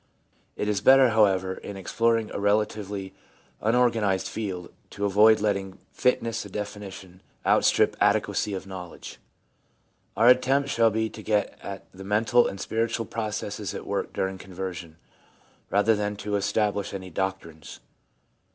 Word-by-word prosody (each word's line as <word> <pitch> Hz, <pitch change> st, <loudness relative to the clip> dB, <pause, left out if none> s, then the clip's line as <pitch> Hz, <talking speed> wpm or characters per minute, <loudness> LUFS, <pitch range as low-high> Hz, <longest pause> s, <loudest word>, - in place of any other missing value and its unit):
It 105 Hz, -, -3 dB
is 105 Hz, -2 st, 0 dB
better, 130 Hz, +2 st, +7 dB
however, 95 Hz, -4 st, +3 dB
in 100 Hz, +1 st, -8 dB
exploring 115 Hz, +3 st, 0 dB
a -, -, -3 dB
relatively 100 Hz, -2 st, -1 dB, 0.5 s
unor 120 Hz, +3 st, +3 dB
ganised 100 Hz, -5 st, 0 dB
field, 95 Hz, -5 st, -5 dB, 0.2 s
to 100 Hz, -, -3 dB
avoid 105 Hz, +2 st, +5 dB
letting 100 Hz, -2 st, -1 dB, 0.2 s
fineness 115 Hz, -3 st, 0 dB
of 100 Hz, -, -11 dB
definition 100 Hz, -3 st, -7 dB, 0.2 s
out -, -, +4 dB
strip -, -, +3 dB
adequacy 105 Hz, -2 st, +1 dB
of 95 Hz, -, -6 dB
knowledge. 90 Hz, -3 st, -9 dB, 1.0 s
Our 115 Hz, -, +5 dB
attempt 135 Hz, +2 st, +3 dB
shall 115 Hz, -3 st, +4 dB
be 110 Hz, +1 st, 0 dB
to 110 Hz, -, -10 dB
get 105 Hz, -1 st, 0 dB
at 100 Hz, -1 st, -7 dB
the 95 Hz, +1 st, -11 dB
mental 105 Hz, +4 st, +3 dB
and 95 Hz, -, -6 dB
spiritual 115 Hz, +2 st, -1 dB
processes 105 Hz, -2 st, -4 dB
at -, -, -6 dB
work -, -, -2 dB
during 95 Hz, 0 st, -3 dB
conversion, 90 Hz, -3 st, -7 dB, 0.7 s
rather 105 Hz, +3 st, +3 dB
than 105 Hz, 0 st, -2 dB
to 105 Hz, 0 st, -3 dB
establish 100 Hz, 0 st, 0 dB
any 95 Hz, -1 st, -7 dB
doc 95 Hz, +2 st, -1 dB
trines. 80 Hz, -2 st, -12 dB
105 Hz, 145 wpm, -26 LUFS, 95-110 Hz, 1.0 s, better